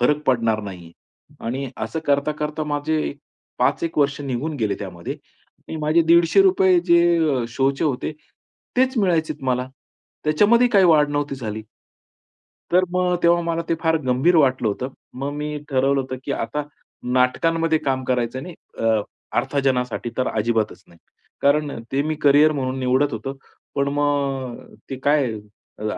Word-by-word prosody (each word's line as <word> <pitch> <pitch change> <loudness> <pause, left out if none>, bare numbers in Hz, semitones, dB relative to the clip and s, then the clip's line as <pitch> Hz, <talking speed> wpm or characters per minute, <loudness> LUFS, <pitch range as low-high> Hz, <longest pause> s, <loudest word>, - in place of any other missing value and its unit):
फरक 150 +5 +2
पडणार 115 -4 +2
नाही 95 -4 -8
आहे - - -17
आणि 135 +3 -3 0.2
असं 160 - -4
करता-करता 150 +2 0
माझे 150 +1 -1 0.5
5 - - +1
एक 165 - -3
वर्ष 140 0 +1
निघून 140 +3 -3
गेले 110 -5 0
त्यामध्ये, 90 -4 -6 0.5
आणि 160 - -5
माझे 155 +2 +3
₹150 180 +3 +5
जे 170 -6 +3
शो 135 +3 +1
चे 140 +4 -3
होते 145 +1 -1 0.6
तेच 260 +1 +2
मिळायचेत 160 -7 0
मला. 125 0 0 0.6
त्याच्यामध्ये 210 +11 +4
काही 200 -5 +4
वाढ 155 -4 +5
नव्हती 145 -1 -1
झाली. 110 -3 -5 1.1
तर 185 +1 +5
मग 180 -1 +1
तेव्हा 170 0 +4
मला 170 0 -1
ते - - +2
फार 160 -1 +3
गंभीर 130 +8 +3
वाटलं 130 -6 +3
होतं, 125 +5 -3 0.3
मग 135 +2 -3
मी 150 0 -4
ठरवलं 135 0 +2
होतं, 130 0 -5
की 140 - -2
आता 135 +4 -2 0.5
नाटकांमध्ये 160 +6 +2
काम 130 -3 -1
करायचं 125 0 -1
नाही 175 +3 -8 0.2
अ, 115 -1 +2 0.4
अर्थाजनासाठी 125 -4 -1
तर 130 - 0
अजिबातच 110 0 -1
नाही. 85 - -20 0.4
कारण 145 -1 +2
ते 135 +1 +2
मी 155 +1 -1
करियर 145 +2 +6
म्हणून 130 -2 -2
निवडत 130 +3 +1
होतो 115 +5 -4 0.4
पण 140 0 +1
मग 140 -4 -2 0.2
ते 135 - -3
काय 145 -4 +2 0.5
अ, 105 - -7
140 Hz, 150 wpm, -22 LUFS, 130-160 Hz, 1.1 s, करियर